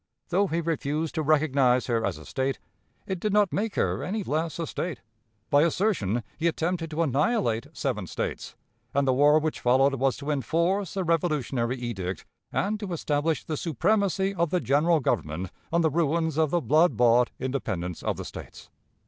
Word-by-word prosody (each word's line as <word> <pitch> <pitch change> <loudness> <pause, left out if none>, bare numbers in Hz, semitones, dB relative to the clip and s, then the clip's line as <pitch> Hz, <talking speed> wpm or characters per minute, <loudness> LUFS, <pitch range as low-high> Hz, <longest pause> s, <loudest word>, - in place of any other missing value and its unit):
Though 195 +3 +2
he 170 0 -1
refused 155 -1 -2
to 160 - -1
recognize 140 -5 +3
her 115 -2 0
as - - -1
a - - -12
State, 135 0 -2 0.5
it 190 -2 -3
did 210 +3 -1
not 205 -2 +3
make 215 0 -1
her - - 0
any 210 +2 -2
less 160 -1 -2
a 165 - -2
State. 160 -5 -4 0.5
By 145 - +6
assertion, 155 - +1 0.2
he 165 - +2
attempted 165 0 -1
to 160 +2 0
annihilate 145 - +1
seven - - -2
States; - - -4 0.4
and 140 -1 +2
the 130 - +4
war 145 +3 +5
which 155 0 -1
followed 130 +3 +3
was 135 0 +1
to 145 +1 -3
enforce 170 - 0
the 190 - 0
revolutionary 145 -7 0
edict, 95 -7 -4 0.3
and 210 +2 -1
to 200 -4 -4
establish 150 -1 0
the 155 - -3
supremacy 195 - +1
of 170 -3 0
the 180 - +1
General 155 +2 +2
Government 85 - -2 0.2
on 170 +1 +3
the 160 -2 +2
ruins 160 0 +1
of 155 -1 +2
the 175 +3 +1
blood 155 -3 +3
bought 120 0 +4
independence 95 - -3
of - - -2
the - - -6
States. - - -10
155 Hz, 180 wpm, -26 LUFS, 130-170 Hz, 0.5 s, By